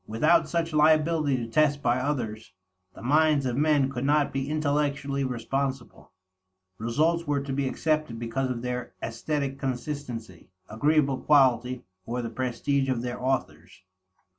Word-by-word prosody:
Without 155 +8 +3
such 165 -1 -1
liability 155 -2 +3
to 120 - -3
test 145 +4 +2
by 120 0 +2
others, 110 -7 -3 0.4
the - - -11
minds 150 +1 +3
of 125 -2 -1
men 145 -1 +3
could 125 -1 -4
not 145 +1 +2
be 135 +1 -2
intellectually 145 -2 0
responsible; 130 +1 -3 0.7
results 155 +9 +1
were 145 -1 +1
to 140 -1 -4
be 135 0 0
accepted 155 -3 -1
because 120 +3 -2
of 120 -1 -4
their 125 0 -4
aesthetic 135 +4 -3
consistency, 125 - -5 0.2
agreeable 140 +3 +1
quality, 125 -4 +3 0.2
or 120 +1 -2
the 115 - -4
prestige 130 +3 -1
of 125 -2 -1
their 125 0 -4
authors. 130 -7 -3
135 Hz, 140 wpm, -27 LUFS, 120-150 Hz, 0.7 s, Without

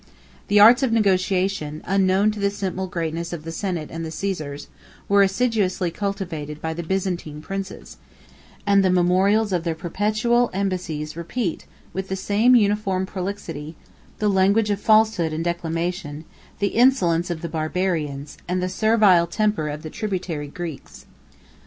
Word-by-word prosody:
The 205 - +4
arts 235 +5 +8
of 265 -4 +1
negotiation, 190 -6 +1
unknown 195 +2 +3
to 210 - -7
the 200 0 +2
simple 190 -2 -3
greatness 170 -1 -3
of 160 -3 -6
the 165 - -6
senate 175 -4 -3
and 165 0 -5
the 160 - -4
Caesars, 155 -4 -4 0.4
were 200 0 +5
assiduously 195 -3 +1
cultivated 170 -7 -4
by 160 0 -3
the 170 - -4
Byzantine 175 -4 -3
princes; 195 +4 -7 0.7
and 200 -1 +4
the 190 - +3
memorials 190 +4 +3
of 175 -2 0
their 165 -2 -1
perpetual 215 +8 +1
embassies 180 -6 -2
2 165 - -8
repeat, 175 +2 -3 0.3
with 190 0 -4
the 190 - -2
same 210 +6 +3
uniform 205 -4 +2
prolixity, 180 -6 -5 0.4
the 210 - 0
language 200 +2 +3
of 205 0 -2
falsehood 215 -7 +3
and 160 +1 -2
declamation, 170 -2 -3 0.3
the 200 - 0
insolence 185 -9 +3
of 170 -2 -3
the - - -2
Barbarians, 155 -3 -2
and 180 +1 0
the 180 0 -1
servile 205 -4 +4
temper 210 -4 0
of 150 +1 -6
the 155 - -7
tributary 185 -8 -3
Greeks. 165 -1 -8
185 Hz, 150 wpm, -23 LUFS, 165-205 Hz, 0.7 s, arts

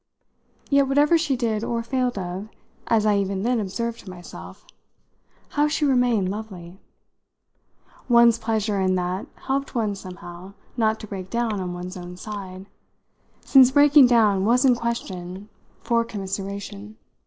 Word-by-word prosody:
Yet 280 -1 +4
whatever 290 +4 +4
she 320 -5 +1
did 225 -3 -1
or 230 0 -2
failed 250 -1 -1
of, 185 +3 -5 0.4
as 220 -2 +2
I 210 -1 +3
even 195 -1 -1
then 245 0 +1
observed 230 +3 -3
to 195 - -11
myself, 175 -1 -11 0.8
how 295 0 +1
she 300 0 0
remained 245 -7 +2
lovely! 190 -4 -8 1.3
One's 235 -1 +6
pleasure 215 -3 -1
in 185 0 +2
that 180 +1 -2 0.2
helped 275 0 -2
one 220 -3 0
somehow 185 -1 -10 0.2
not 220 -2 +1
to 215 - -8
break 190 -2 -7
down 230 -3 -1
on 180 -1 -4
one's 180 +2 -7
own 180 0 -9
side 190 -2 -8 0.8
since 265 -2 +6
breaking 285 0 +6
down 215 -5 +3
was 245 +5 +3
in 255 - +6
question 200 -5 -5 0.3
for 235 -1 +2
commiseration. 200 0 -6
215 Hz, 145 wpm, -23 LUFS, 190-240 Hz, 1.3 s, One's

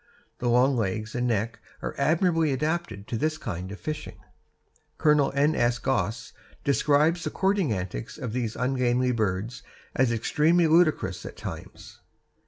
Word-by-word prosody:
The 120 - 0
long 125 +3 +4
legs 110 0 -2
and 125 0 0
neck 115 0 -1 0.2
are - - -3
admirably 165 -1 +2
adapted 135 - -2
to 115 - -1
this 155 +5 0
kind 90 - -5
of 100 - -8
fishing. 155 -1 -5 0.8
Colonel 150 -2 +3
N. 145 +3 +3
S. 120 0 +2
Goss 110 -3 -2 0.3
describes 150 +4 +3
the - - -1
courting 190 - +1
antics 95 +3 -4
of 125 -7 -5
these 120 -3 -2
ungainly 125 0 +1
birds 110 +1 -2 0.3
as 130 -2 +2
extremely 155 +9 +3
ludicrous 155 - +2
at - - -9
times. - - -9
125 Hz, 145 wpm, -26 LUFS, 110-155 Hz, 0.8 s, long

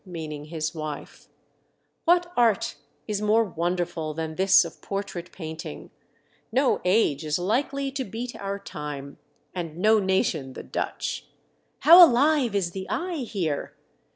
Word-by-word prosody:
meaning 155 -5 -7
his 155 0 -3
wife. 155 -3 -7 0.8
"What 350 +1 +3
art 230 -4 +2 0.3
is 210 -1 -2
more 215 +2 +4
wonderful 170 -4 -2
than 160 0 -3
this 190 +1 +5
of 165 - -10
portrait 195 -3 -5
paint 160 -2 -7
ing? - - -9 0.6
No 265 0 +2
age 180 -6 +2
is 150 0 0
likely 270 +9 -1
to 270 0 -3
beat 240 +3 -6
our 200 0 -4
time, 145 -7 -7 0.3
and 165 -3 -5
no 215 +4 +4
nation 185 -8 0
the - - -8
Dutch. - - -4 0.5
How 345 +3 +10
alive 280 -4 +4
is 185 -4 0
the 190 +1 -6
eye 350 -1 -2
here 190 - -3
190 Hz, 140 wpm, -25 LUFS, 160-230 Hz, 0.8 s, How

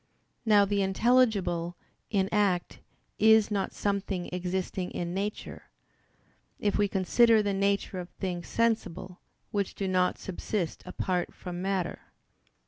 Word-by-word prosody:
Now 205 -2 +6
the 200 0 0
intelligible 195 -5 +2 0.3
in 195 -4 +1
act 200 -4 +1 0.4
is 220 0 +5
not 195 -2 -1
something 200 -3 -2
existing 180 0 -2
in 175 0 -4
nature; 200 +3 -5 0.9
if 205 -1 0
we 205 -1 +3
consider 215 +4 +4
the 200 -1 0
nature 200 -1 0
of 175 0 -7
things 175 -3 -5
sensible, 210 -6 -1 0.3
which 200 -2 -1
do 195 - -2
not 185 -1 +2
subsist 185 -1 -3
apart 180 -1 -2
from 175 0 -6
matter. 190 -2 -1
195 Hz, 125 wpm, -29 LUFS, 180-205 Hz, 0.9 s, Now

